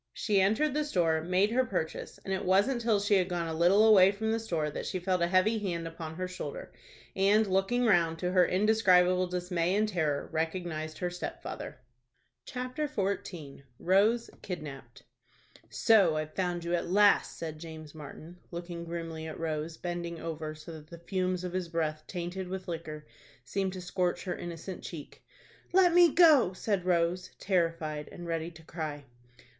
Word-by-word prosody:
She 200 Hz, -2 st, +1 dB
entered 220 Hz, +10 st, +2 dB
the 300 Hz, +1 st, +1 dB
store, 170 Hz, -, +1 dB
made 185 Hz, +5 st, +2 dB
her 255 Hz, +2 st, +3 dB
purchase, 180 Hz, -9 st, -4 dB
and 195 Hz, -, -2 dB
it 190 Hz, -, -2 dB
wasn't 200 Hz, +7 st, +2 dB
till 225 Hz, -3 st, +2 dB
she 205 Hz, +1 st, +1 dB
had 185 Hz, -1 st, +1 dB
gone 175 Hz, -2 st, -2 dB
a 160 Hz, -, -3 dB
little 180 Hz, +6 st, +5 dB
away 195 Hz, -3 st, +7 dB
from 220 Hz, +2 st, -2 dB
the 225 Hz, -, 0 dB
store 165 Hz, -9 st, -2 dB
that -, -, -5 dB
she 185 Hz, -, -2 dB
felt 180 Hz, 0 st, 0 dB
a 170 Hz, -, +3 dB
heavy 190 Hz, +5 st, +3 dB
hand 170 Hz, -5 st, -3 dB
upon 165 Hz, -1 st, -7 dB
her 185 Hz, +2 st, -3 dB
shoulder, 450 Hz, -, -7 dB, 0.4 s
and, 205 Hz, +3 st, +4 dB
looking 195 Hz, +6 st, +1 dB
round, 170 Hz, -6 st, +3 dB
to 180 Hz, +1 st, -2 dB
her 180 Hz, -1 st, +5 dB
indescribable 185 Hz, -2 st, +3 dB
dismay 180 Hz, 0 st, -1 dB
and 215 Hz, +1 st, +2 dB
terror, 155 Hz, -8 st, -1 dB
recognized 160 Hz, -1 st, -3 dB
her 180 Hz, -1 st, -2 dB
stepfather. 175 Hz, -6 st, -6 dB, 0.7 s
CHAPTER 255 Hz, +4 st, -3 dB
XIV. 180 Hz, -, -4 dB, 0.2 s
ROSE 210 Hz, +6 st, +2 dB
KIDNAPPED. 135 Hz, -8 st, -8 dB, 0.7 s
"So 200 Hz, -9 st, +4 dB
I've 155 Hz, 0 st, -3 dB
found 175 Hz, -2 st, -2 dB
you 170 Hz, +1 st, -2 dB
at 175 Hz, -, -1 dB
last," 205 Hz, +2 st, +4 dB
said 155 Hz, -2 st, -6 dB
James 155 Hz, -2 st, -9 dB
Martin, 160 Hz, +3 st, -11 dB
looking 170 Hz, -1 st, -6 dB
grimly 165 Hz, -1 st, -5 dB
at 160 Hz, -, -7 dB
Rose, 160 Hz, 0 st, -3 dB
bending 170 Hz, -1 st, -4 dB
over 155 Hz, -2 st, -5 dB
so 155 Hz, +2 st, -10 dB
that 155 Hz, -2 st, -10 dB
the 170 Hz, -, -10 dB
fumes 185 Hz, +1 st, -2 dB
of 180 Hz, -1 st, -4 dB
his 185 Hz, -2 st, -2 dB
breath, 155 Hz, -2 st, -2 dB
tainted 180 Hz, +1 st, -4 dB
with 185 Hz, 0 st, -6 dB
liquor, 155 Hz, -3 st, -6 dB, 0.4 s
seemed 190 Hz, +6 st, -2 dB
to 185 Hz, -, -6 dB
scorch 175 Hz, 0 st, -1 dB
her 180 Hz, -2 st, -3 dB
innocent 175 Hz, +2 st, -7 dB
cheek. 155 Hz, -5 st, -9 dB, 0.5 s
"Let 360 Hz, -1 st, +5 dB
me 350 Hz, -2 st, +7 dB
go," 300 Hz, -, +6 dB
said 190 Hz, -1 st, -1 dB
Rose, 180 Hz, +1 st, +1 dB
terrified 165 Hz, -5 st, -1 dB
and 175 Hz, -, -9 dB
ready 165 Hz, 0 st, -2 dB
to 165 Hz, -1 st, -15 dB
cry. 155 Hz, -3 st, -6 dB
180 Hz, 175 wpm, -30 LUFS, 165-195 Hz, 0.7 s, away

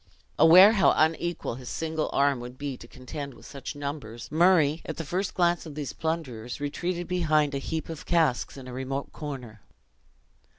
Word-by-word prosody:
Aware 185 Hz, +6 st, +9 dB
how 200 Hz, -4 st, +4 dB
unequal 165 Hz, -2 st, 0 dB
his 125 Hz, -, -8 dB
single 160 Hz, -1 st, -2 dB
arm 140 Hz, -2 st, +2 dB
would 125 Hz, +1 st, -9 dB
be 140 Hz, -1 st, -4 dB
to 120 Hz, -, -13 dB
contend 140 Hz, +2 st, -8 dB
with -, -, -16 dB
such 140 Hz, +1 st, -7 dB
numbers, 135 Hz, -5 st, -6 dB
Murray, 160 Hz, -2 st, +4 dB
at 160 Hz, -, -6 dB
the 165 Hz, -, -4 dB
first 185 Hz, +5 st, -2 dB
glance 175 Hz, -1 st, +1 dB
of 150 Hz, -, -9 dB
these 145 Hz, -5 st, -4 dB
plunderers, 135 Hz, -8 st, -4 dB
retreated 175 Hz, +5 st, -3 dB
behind 155 Hz, -5 st, +2 dB
a 140 Hz, -, -1 dB
heap 160 Hz, +3 st, -4 dB
of 160 Hz, -2 st, -8 dB
casks 160 Hz, -7 st, +1 dB
in 130 Hz, -1 st, -9 dB
a 125 Hz, -, -7 dB
remote 135 Hz, +2 st, -4 dB
corner. 125 Hz, -8 st, -7 dB
150 Hz, 175 wpm, -27 LUFS, 130-165 Hz, -, Aware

